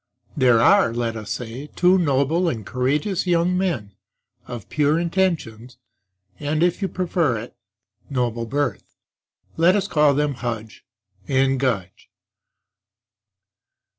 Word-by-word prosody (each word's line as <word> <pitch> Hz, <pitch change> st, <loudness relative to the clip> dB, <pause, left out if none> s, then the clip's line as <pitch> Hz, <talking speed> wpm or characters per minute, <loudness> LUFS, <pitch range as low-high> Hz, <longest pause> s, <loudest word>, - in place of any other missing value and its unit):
There 125 Hz, -5 st, +4 dB
are, 115 Hz, 0 st, +4 dB
let 115 Hz, -1 st, -2 dB
us 110 Hz, -1 st, -7 dB
say, 125 Hz, +4 st, -5 dB
two 180 Hz, +1 st, +4 dB
noble 160 Hz, +3 st, +1 dB
and 110 Hz, -9 st, -5 dB
courageous 145 Hz, -, -1 dB
young 175 Hz, +1 st, +2 dB
men, 170 Hz, -, -1 dB, 0.6 s
of 120 Hz, -5 st, -7 dB
pure 150 Hz, +1 st, +1 dB
intentions 165 Hz, -, -2 dB, 0.6 s
and 155 Hz, +3 st, 0 dB
(if 175 Hz, +3 st, +1 dB
you 195 Hz, -, 0 dB
prefer 170 Hz, -, 0 dB
it) 115 Hz, +3 st, -8 dB, 0.5 s
noble 120 Hz, -4 st, -2 dB
birth; 140 Hz, -3 st, -3 dB, 0.6 s
let 170 Hz, +4 st, +4 dB
us 200 Hz, -1 st, 0 dB
call 150 Hz, -6 st, +3 dB
them 150 Hz, 0 st, 0 dB
Hudge 115 Hz, -2 st, -5 dB, 0.4 s
and 135 Hz, -1 st, +2 dB
Gudge. 100 Hz, -9 st, -2 dB
140 Hz, 120 wpm, -22 LUFS, 120-170 Hz, 0.6 s, There